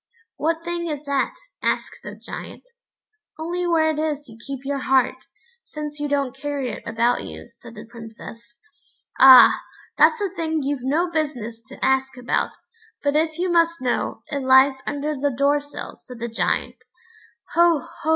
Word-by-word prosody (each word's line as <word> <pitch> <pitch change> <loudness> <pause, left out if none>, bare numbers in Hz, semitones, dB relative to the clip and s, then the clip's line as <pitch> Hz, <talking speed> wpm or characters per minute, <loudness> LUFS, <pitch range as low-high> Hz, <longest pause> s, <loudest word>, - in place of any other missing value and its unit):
"What 330 +1 -1
thing 345 0 -3
is 300 -2 -5
that?" 280 -1 0 0.3
asked - - -1
the - - -8
Giant. - - -9 0.7
"Only 350 +3 -2
where 320 -2 +3
it 305 - -4
is 300 -2 -2
you 225 - -13
keep 275 -1 -6
your 280 0 -1
heart, 260 -1 +1 0.4
since 300 -1 -7
you 295 - -1
don't 280 -2 -1
carry 275 -2 -3
it - - -7
about 230 +2 +1
you," - - -9
said 235 -1 -12
the 210 +2 -9
Princess. 225 0 -11 0.8
"Ah! 260 -1 +9 0.4
that's 465 - +5
a 400 -3 -1
thing 320 -4 -2
you've 280 -1 -2
no 315 +7 0
business 250 -8 -3
to - - -5
ask 265 0 +1
about; 250 0 -1 0.5
but 285 0 +1
if 315 0 +1
you 360 +1 0
must 335 0 +3
know, 250 -2 -2
it 285 - -1
lies 265 0 +5
under 290 +1 -2
the 285 +1 0
door 285 +1 +3
sill," 290 0 -9
said 250 -2 -11
the 235 +1 -4
Giant. 230 - -1 0.8
"Ho! 335 -1 +4
ho!" 315 - -3
285 Hz, 170 wpm, -22 LUFS, 260-315 Hz, 0.8 s, Ah